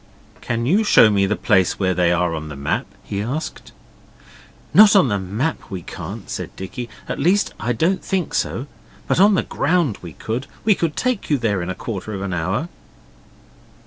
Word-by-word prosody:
'Can 115 0 -2
you 195 - +3
show 115 - +6
me 100 -1 +2
the 105 - 0
place 95 -6 +2
where 95 -2 +1
they 90 -1 +2
are 85 -1 +1
on 80 -1 -5
the 75 - -7
map?' 70 +1 -2 0.2
he 100 - -3
asked. 125 - -5 1.0
'Not 210 +1 +8
on 180 -10 +5
the 100 -1 0
map, 110 - -3
we 95 -4 -6
can't,' - - -7
said - - -5
Dicky 115 +6 -6 0.2
'at - - -4
least, 180 +8 +2
I 120 +3 -1
don't 170 +11 0
think 185 -4 -2
so, 125 - -1 0.4
but - - +1
on 200 +1 +6
the - - +1
ground 150 - 0
we 85 -3 -9
could. 115 - -4 0.2
We 215 - +6
could 165 -5 -2
take 255 -5 -1
you 145 - +3
there 105 -6 0
in 85 - -4
a 95 - -3
quarter 110 0 -5
of 95 - -4
an 95 -2 -3
hour. 90 - -1
115 Hz, 195 wpm, -21 LUFS, -, 1.0 s, Not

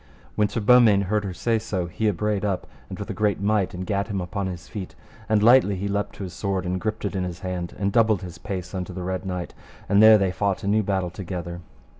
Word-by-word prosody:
When 105 -1 +2
Sir 115 - -2
Beaumains 110 -3 +6
heard 105 +2 0
her 95 - -4
say 115 +2 +1
so, 95 -4 -3
he 110 +6 -2
abraid 105 +1 0
up 100 -3 -1 0.2
with - - -5
a - - -3
great 105 -2 0
might 100 -2 +1
and 90 +1 -5
gat 100 -1 -1
him 100 -3 -2
upon 95 +2 -3
his 90 -2 -7
feet, 95 -4 -7 0.3
and 105 -1 +3
lightly 120 -3 +6
he 95 +2 -3
leapt 100 0 -2
to - - -7
his 90 -3 -6
sword 95 0 -2
and 90 0 -2
gripped 110 0 -3
it 100 - -3
in 95 - -1
his 90 0 -5
hand, 90 -2 -4
and 100 0 0
doubled 110 -3 +3
his 90 -1 -8
pace 90 0 -5
unto 90 -1 -4
the 90 0 -5
Red 95 +1 -3
Knight, 90 -2 -4 0.3
and 100 +1 +4
there 110 0 +9
they 95 -2 +1
fought 95 +2 -1
a - - -3
new 105 +2 +3
battle 95 -3 -1
together. 85 -2 -6
100 Hz, 245 wpm, -24 LUFS, 90-105 Hz, 0.3 s, there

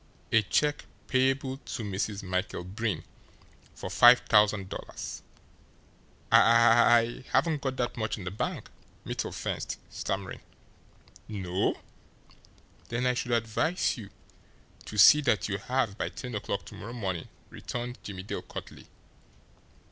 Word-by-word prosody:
"A 115 - +5
check 145 +10 0 0.2
payable 130 0 +1
to 130 -4 -6
Mrs. 100 +1 -3
Michael 90 -1 -2
Breen 95 -2 -3 0.7
for 90 - -6
five 120 +5 +7
thousand 105 -2 +3
dollars." - - -7 1.1
"I 115 0 +5
I - - -17
haven't 160 -4 +2
got 135 -1 -2
that 120 - -1
much 110 0 -2
in 100 - -7
the 90 - -4
bank," 100 - -4 0.3
Mittel - - -3
fenced, - - -4
stammering. - - -4 0.9
"No? 95 -3 -1 1.1
Then 120 +2 -1
I 125 - +3
should 120 0 -2
advise 115 +10 +1
you 105 -5 -9 0.8
to 105 - -7
see 150 +9 +9
that 105 -10 +1
you 100 0 -2
have 115 -2 -1
by - - -1
ten 125 -2 -7
o'clock 100 -3 -3
to - - -11
morrow 105 +3 -8
morning!" 95 -8 -3 0.2
returned 125 0 -5
Jimmie 95 -2 -7
Dale - - -4
curtly. - - -10
110 Hz, 135 wpm, -29 LUFS, 100-125 Hz, 1.1 s, see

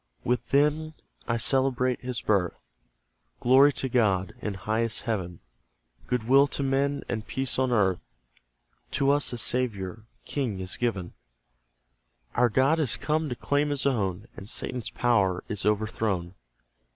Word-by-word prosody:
With 120 -1 0
them 150 +2 +2 0.3
I 115 - +1
celebrate 130 0 +1
His 125 -2 -3
birth 90 - 0 0.7
Glory 135 +4 +6
to 130 - -1
God, 105 -7 +1
in 105 -3 -3
highest 110 +3 -1
Heaven, 90 -7 -3 0.7
Good 125 -3 -1
will 135 +2 +6
to 140 - -3
men, 140 +1 0
and 110 -2 -4
peace 130 -1 -1
on 130 -1 +1
earth, 95 -6 +2 0.9
To 140 0 +3
us 145 0 +2
a 120 - -4
Saviour 110 -4 -2 0.2
king 120 -9 -2
is 95 0 -3
given; 100 -8 -2 1.2
Our 120 0 +3
God 135 +8 +3
is 140 -7 +2
come 155 0 -1
to 125 - -3
claim 145 +4 0
His 145 -1 -1
own, 105 -6 0
And 95 - -8
Satan's 125 -1 -3
power 100 -7 +1
is 105 -2 -2
overthrown! 105 -4 -1
120 Hz, 140 wpm, -27 LUFS, 105-135 Hz, 1.2 s, Glory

